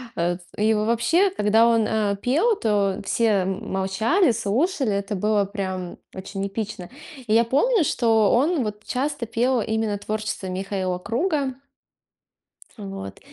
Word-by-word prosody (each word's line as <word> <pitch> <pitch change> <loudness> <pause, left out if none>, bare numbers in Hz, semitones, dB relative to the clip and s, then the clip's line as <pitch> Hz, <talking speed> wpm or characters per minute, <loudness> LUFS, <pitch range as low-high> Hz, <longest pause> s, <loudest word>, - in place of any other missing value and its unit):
Э, 175 +1 0 0.2
и 215 +1 +3
вообще, 235 - +2
когда 225 - +3
он, 230 -2 +3
э, 210 -2 0
пел, 330 - +2
то 205 - 0
все 230 - +1 0.2
м 195 +3 -4
молчали, 220 - +2
слушали, 250 - 0
это 200 +1 -2
было 210 +1 +1
прям 190 -3 -5 0.2
очень 195 +1 -5
эпично. 205 -2 -5 0.4
И 215 - +1
я 230 +1 +5
помню, 330 - +2
что 225 -6 +2
он 285 +3 +2
вот 210 0 -5
часто 275 -1 -2
пел 240 +2 +1
именно 220 -1 -1
творчество 215 -2 -4
Михаила 185 0 -2
Круга. 265 - -1 1.2
Вот. 195 -2 -7
215 Hz, 135 wpm, -23 LUFS, 195-245 Hz, 1.2 s, я